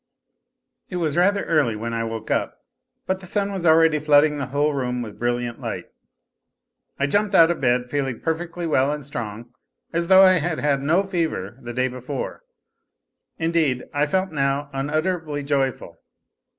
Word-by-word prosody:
It 185 Hz, -, -6 dB
was 160 Hz, -4 st, -1 dB
rather 200 Hz, +3 st, +3 dB
early 150 Hz, -9 st, +2 dB
when 115 Hz, +2 st, -4 dB
I 115 Hz, 0 st, -1 dB
woke 115 Hz, -1 st, -5 dB
up, -, -, -1 dB, 0.5 s
but 190 Hz, 0 st, -1 dB
the 190 Hz, -, -10 dB
sun 200 Hz, +1 st, -1 dB
was 185 Hz, -3 st, -2 dB
already 160 Hz, -1 st, +5 dB
flooding 150 Hz, 0 st, +4 dB
the 140 Hz, -, -3 dB
whole 145 Hz, +3 st, +1 dB
room 125 Hz, -3 st, -2 dB
with 105 Hz, -3 st, -10 dB
brilliant 120 Hz, 0 st, -2 dB
light. -, -, -4 dB, 1.1 s
I 140 Hz, -, +1 dB
jumped 205 Hz, +6 st, +1 dB
out 165 Hz, -1 st, +7 dB
of 170 Hz, -, -4 dB
bed 125 Hz, -1 st, +2 dB
feeling 135 Hz, -2 st, -2 dB
perfectly 170 Hz, +1 st, -3 dB
well 140 Hz, -3 st, +2 dB
and 150 Hz, -2 st, -4 dB
strong, 120 Hz, -4 st, -6 dB, 0.4 s
as 170 Hz, 0 st, 0 dB
though 190 Hz, +1 st, +8 dB
I 185 Hz, -1 st, +5 dB
had 160 Hz, 0 st, -2 dB
had 140 Hz, -2 st, +1 dB
no 165 Hz, +7 st, +2 dB
fever 160 Hz, -, -3 dB
the 120 Hz, -1 st, -6 dB
day 130 Hz, +2 st, 0 dB
before; 130 Hz, -, -5 dB, 1.0 s
indeed, 160 Hz, -6 st, +1 dB
I 145 Hz, +1 st, +1 dB
felt 190 Hz, +4 st, 0 dB
now 140 Hz, 0 st, -1 dB
unutterably 155 Hz, +2 st, -2 dB
joyful. 135 Hz, -3 st, -1 dB
145 Hz, 165 wpm, -23 LUFS, 130-170 Hz, 1.1 s, though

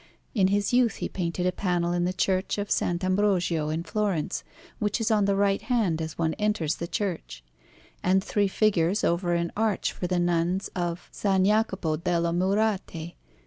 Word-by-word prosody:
In 195 Hz, -5 st, +3 dB
his 205 Hz, +3 st, 0 dB
youth 245 Hz, -3 st, +3 dB
he -, -, -3 dB
painted 180 Hz, -1 st, -3 dB
a 180 Hz, -, +3 dB
panel 175 Hz, -2 st, 0 dB
in 175 Hz, 0 st, +1 dB
the 180 Hz, -, +1 dB
Church 185 Hz, +1 st, 0 dB
of 205 Hz, 0 st, -3 dB
S. -, -, +2 dB
Ambrogio 180 Hz, -3 st, +1 dB
in 160 Hz, +2 st, -2 dB
Florence, 195 Hz, -4 st, -1 dB, 0.4 s
which 210 Hz, 0 st, 0 dB
is 225 Hz, 0 st, 0 dB
on 210 Hz, -2 st, +3 dB
the 200 Hz, 0 st, +2 dB
right 200 Hz, 0 st, +2 dB
hand 215 Hz, -8 st, 0 dB
as 160 Hz, 0 st, -5 dB
one 160 Hz, -1 st, 0 dB
enters 210 Hz, -7 st, 0 dB
the 170 Hz, -, -4 dB
church; 165 Hz, -, -4 dB, 0.6 s
and 190 Hz, +1 st, +2 dB
three 205 Hz, -1 st, +1 dB
figures 195 Hz, -1 st, +1 dB
over 175 Hz, 0 st, +1 dB
an 170 Hz, 0 st, -1 dB
arch 220 Hz, -1 st, 0 dB
for 180 Hz, -, -4 dB
the 180 Hz, 0 st, 0 dB
Nuns 175 Hz, +2 st, 0 dB
of 175 Hz, -1 st, -3 dB
S. -, -, -11 dB, 0.2 s
Jacopo 195 Hz, -6 st, +1 dB
delle 170 Hz, 0 st, 0 dB
Murate. 185 Hz, -3 st, 0 dB
185 Hz, 180 wpm, -26 LUFS, 170-205 Hz, 0.6 s, In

